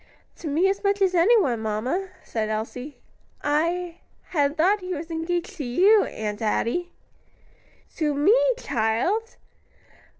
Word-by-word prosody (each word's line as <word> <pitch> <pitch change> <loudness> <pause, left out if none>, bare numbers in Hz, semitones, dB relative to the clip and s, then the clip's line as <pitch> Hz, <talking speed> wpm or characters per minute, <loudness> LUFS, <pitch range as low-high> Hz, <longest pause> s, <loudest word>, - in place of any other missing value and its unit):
"To 330 - -7
me 315 +6 +2
as 395 +1 -1
much 400 0 +1
as 380 -2 +2
anyone, 345 - +3
mamma," 245 - -2
said 220 -2 -3
Elsie. 245 +6 -5 0.5
"I 335 +4 0 0.3
had 290 -2 +1
thought 380 +6 +3
he 365 -1 -4
was 325 +2 -7
engaged 345 +3 -3
to 300 - -4
you, 380 - +4
Aunt 210 -1 -5
Adie." 235 +11 -1 1.1
"To 300 -3 0
me, 305 +11 +4 0.2
child!" 285 - -1
325 Hz, 130 wpm, -24 LUFS, 245-370 Hz, 1.1 s, you